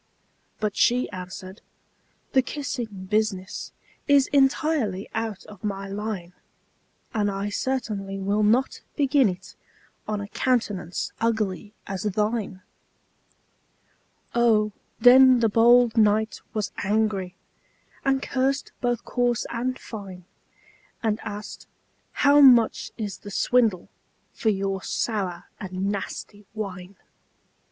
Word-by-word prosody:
But 210 -1 -1
she 250 +1 +3
answered, 185 +1 -8 0.7
"The 265 - +5
kissing 240 -8 -5
business 210 -3 -1 0.4
Is 285 -2 +5
entirely 270 - +2
out 225 -3 -3
of 205 -3 -14
my 195 -1 -3
line; 200 -3 -5 0.8
And 210 -3 +1
I 200 +1 -3
certainly 205 -5 -2
will 200 +2 0
not 230 +6 +2
begin 275 -4 +3
it 185 0 -8 0.5
On 210 -1 -2
a 200 - -5
countenance 195 -9 -1
ugly 215 -3 -1
as 190 -2 -4
thine!" 210 -2 -1 1.7
Oh, 220 -3 +3 0.3
then 255 +1 +8
the 225 -1 +3
bold 235 +1 +5
knight 220 0 +2
was 215 -2 -2
angry, 200 -3 0 0.7
And 270 -1 +1
cursed 270 +1 -1
both 240 -1 -1
coarse 245 -1 0
and 255 +2 -2
fine; 190 -5 -9 0.8
And 220 -1 +1
asked, 210 -1 -8 0.6
"How 285 +1 +7
much 245 -5 +5
is 210 -4 -5
the 205 - -10
swindle 220 -3 +2 0.5
For 220 - 0
your 195 -1 -1
sour 190 -7 -2 0.2
and 190 +1 -3
nasty 205 0 -6
wine?" 195 -3 -6
215 Hz, 110 wpm, -25 LUFS, 195-240 Hz, 1.7 s, then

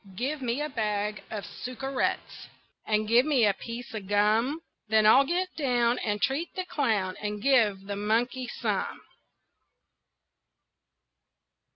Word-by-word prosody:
Give 275 +7 -2
me 250 +3 -1
a 300 - -3
bag 210 -4 -2
of 210 -2 -5
suckerettes 255 +2 -3 0.4
And 215 0 +1
give 235 +3 +5
me 275 -6 +3
a 205 - +3
piece 235 +5 -8
of 210 -3 -6
gum, 215 +9 +2 0.3
Then 215 0 +3
I'll 265 +6 +7
get 365 +3 0
down 245 -5 +1
And 210 -1 -1
treat 285 - -1
the 370 -1 -3
clown, 220 - 0
And 210 0 -3
give 220 -6 +3
the 200 0 -4
monkey 235 +5 0
some. - - -3
235 Hz, 135 wpm, -28 LUFS, 210-270 Hz, 0.4 s, I'll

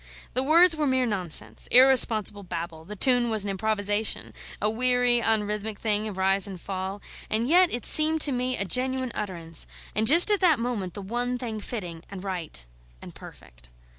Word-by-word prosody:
The 255 - 0
words 330 +5 +4
were 305 -2 -2
mere 260 -1 +1
nonsense, 170 - -1
irresponsible 235 -5 +4
babble; 170 -3 -7
the 210 +4 -9
tune 245 +2 +4
was 220 -3 -1
an 200 - -3
improvisation, 205 +1 -2 0.3
a 210 - 0
weary, 245 +1 +3
unrhythmic 210 -1 0
thing 215 0 -1
of 200 -3 -8
rise 195 +1 +2
and 190 -3 -9
fall: 190 +2 -6 0.3
and 225 +2 -1
yet 355 +4 +4
it 240 - -5
seemed 315 +1 +1
to 290 - +5
me 250 0 -2
a 200 - -3
genuine 260 +3 -2
utterance, 170 -5 -5 0.3
and 220 +2 0
just 340 +8 +6
at 410 - +2
that 340 -6 +3
moment 230 -7 -4
the 200 - -8
one 245 +4 -3
thing 230 -3 -6
fitting 180 -7 -7
and 195 -1 -9
right 175 - -6 0.3
and - - -12
perfect. - - -15
215 Hz, 180 wpm, -25 LUFS, 195-250 Hz, 0.3 s, just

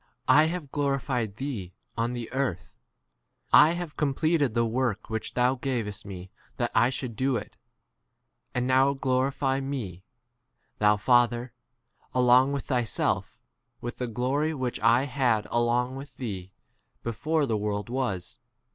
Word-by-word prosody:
I 150 +1 +7
* - - +1
have 165 -5 -4
glorified 135 -7 -1
thee 110 -8 -5 0.2
on 115 +1 -1
the 120 -2 -5
earth, 130 -10 -2 0.8
[I 160 - +8
have] 175 -1 -4
d - - -32
completed 145 -2 +1
the 115 0 +3
work 115 -2 -1
which 110 0 -3
thou 125 +1 +3
gavest 120 -7 -3
me 95 -1 -8 0.3
that - - -1
I 120 - +4
should 130 -3 -4
do 130 +1 +1
5 - - -1
[it]; - - -26 1.0
and 125 0 +1
now 130 +2 +4
glorify 135 +1 0
me, 120 -10 -5 0.8
thou 105 0 +4
Fa 120 +3 +5
ther, 120 0 -6 0.6
along 125 +2 +5
with 140 -2 -2
e - - -22
thyself, 120 -6 -1 0.4
with 120 - -6
the 125 - -1
glory 135 +7 0
which 130 -3 -3
I 115 +3 +4
had 125 -6 +1
along 120 +2 +1
with 135 +1 -8
e 100 -8 -4
6 - - -24
thee - - -40 0.5
before 150 +7 0
the 115 -5 0
world 105 -1 -2
was. 115 -8 -3
125 Hz, 160 wpm, -27 LUFS, 115-135 Hz, 1.0 s, I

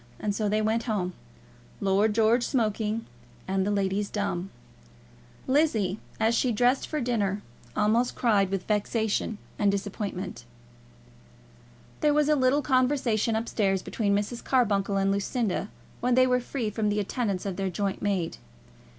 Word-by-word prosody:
And 205 - -1
so 210 0 -1
they 215 +1 +1
went 220 +2 +1
home, 195 -6 -1 0.7
Lord 200 +2 +2
George 230 +2 +4
smoking, 220 -2 0 0.4
and 190 0 0
the - - +1
ladies 200 0 0
dumb. 195 -3 -2 1.0
Lizzie, 225 - +2 0.2
as 220 +1 +3
she 245 +1 +2
dressed 245 +4 +2
for 305 - -2
dinner, 210 -6 -1 0.3
almost 225 +4 +2
cried 205 -5 +2
with 195 -1 -2
vexation 215 0 0 0.2
and 205 -1 +4
disappointment. 200 -1 -4 1.6
There 295 -1 +3
was 300 0 +3
a 305 - +5
little 270 +1 +3
conversation 255 -4 +2
up 225 +1 -1
stairs 195 -3 0
between 205 -3 0
Mrs. 210 +4 -2
Carbuncle 200 -6 +2
and 195 0 +2
Lucinda, 200 0 -1 0.3
when 245 0 +2
they 255 0 +6
were 250 0 +2
free 245 -3 -3
from 210 0 0
the 205 0 0
attendance 205 -2 -2
of 195 -2 -2
their 195 -1 -1
joint 195 +1 -2
maid. 195 -5 -1
215 Hz, 150 wpm, -27 LUFS, 200-240 Hz, 1.6 s, they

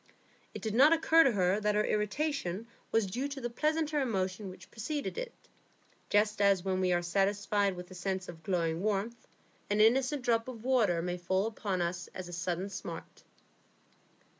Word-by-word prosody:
It - - -7
did 220 -2 -2
not 280 +7 +7
occur 330 0 +5
to 270 - +5
her 190 0 +2
that 210 0 +1
her 210 - +3
irritation 210 - -1 0.3
was 225 -2 +3
due 245 +9 -2
to 280 -1 -6
the 240 -2 -4
pleasanter 305 +3 0
emotion 195 -5 -1
which 185 - -13
preceded 285 +6 -3
it, - - -4 0.8
just 210 0 +2
as 195 -2 +3
when 190 -1 0
we 185 -1 +2
are 175 0 +2
satisfied 200 +2 +1
with 180 +1 -9
a - - -8
sense 185 0 -3
of 165 -2 -9
glowing 165 -2 -1
warmth 215 +3 -2 0.4
an 205 +1 +1
innocent 260 +5 +3
drop 230 -1 +1
of 255 - -5
cold 225 - -13
water 225 -10 +2
may 180 0 -2
fall 190 +3 0
upon 200 -5 -2
us 175 0 -3
as 185 -1 -6
a 175 - -9
sudden 175 +3 -2
smart. 170 -4 -8
205 Hz, 185 wpm, -31 LUFS, 185-240 Hz, 0.8 s, not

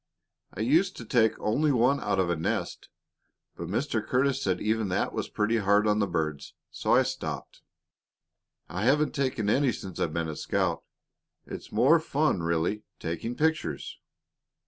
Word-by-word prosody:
I - - -4
used 165 - +2
to 115 - -8
take 110 -1 +2
only 145 +8 +1
one 130 +2 +3
out - - -1
of 90 -2 +1
a - - +1
nest, 80 - -3 0.7
but 85 - -6
Mr. 110 - -1
Curtis 135 +1 +1
said 95 -5 0
even 110 0 0
that 90 - 0
was - - -3
pretty 110 +2 +1
hard 105 0 +3
on 105 0 +2
the 100 - +2
birds, 75 -4 -3 0.2
so - - +1
I - - +5
stopped. - - -5 1.1
I 90 - -5
haven't 150 +3 +3
taken 130 -7 -1
any 130 +4 +3
since 95 -5 -7
I've 80 - 0
been 85 +1 -2
a 80 - -5
scout. - - -1 0.6
It's - - -8
more 130 +10 +5
fun, 150 - 0
really, 85 +5 0 0.2
taking 85 +9 -4
pictures." 160 +2 -1
110 Hz, 165 wpm, -28 LUFS, 95-135 Hz, 1.1 s, I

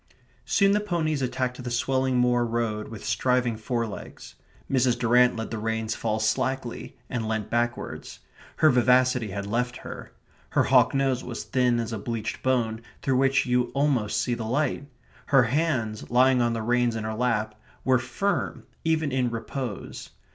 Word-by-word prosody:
Soon 200 -1 +3
the 205 - +3
ponies 165 -8 -1
attacked 125 0 -2
the 125 - -4
swelling 130 +1 +1
moor 125 0 +3
road 115 -2 -2
with 110 -2 -9
striving 120 +1 +1
forelegs. 115 -1 -5 0.3
Mrs. 125 -2 +2
Durrant 125 +1 +4
let 115 0 -5
the 115 - -3
reins 110 0 -1
fall 110 -1 -2
slackly, 120 +3 -2
and 115 -3 -3
leant 110 -1 -2
backwards. 120 +1 -2 0.4
Her 155 - +5
vivacity 125 -1 +3
had 100 +1 -4
left 125 +4 -1
her. - - -8 0.4
Her - - +2
hawk - - +4
nose 135 -2 +1
was 120 -2 -5
thin 125 -2 +1
as 115 0 -3
a 110 - -3
bleached 110 0 -4
bone 115 -4 0 0.2
through 130 -2 +2
which 135 0 +3
you 125 -1 +2
almost 135 -7 +1
see 125 - 0
the 120 -1 -3
light. 140 +3 -1 0.4
Her 135 -3 +5
hands, 120 -5 -1
lying 125 +1 +4
on 120 -1 +1
the 115 -1 -3
reins 120 0 +1
in 110 - -3
her 110 0 -3
lap, 110 -2 0 0.3
were 130 -1 +4
firm 130 +12 -2 0.2
even 160 -3 +1
in 130 -2 +1
repose. 115 -1 -5
125 Hz, 165 wpm, -26 LUFS, 115-130 Hz, 0.4 s, Her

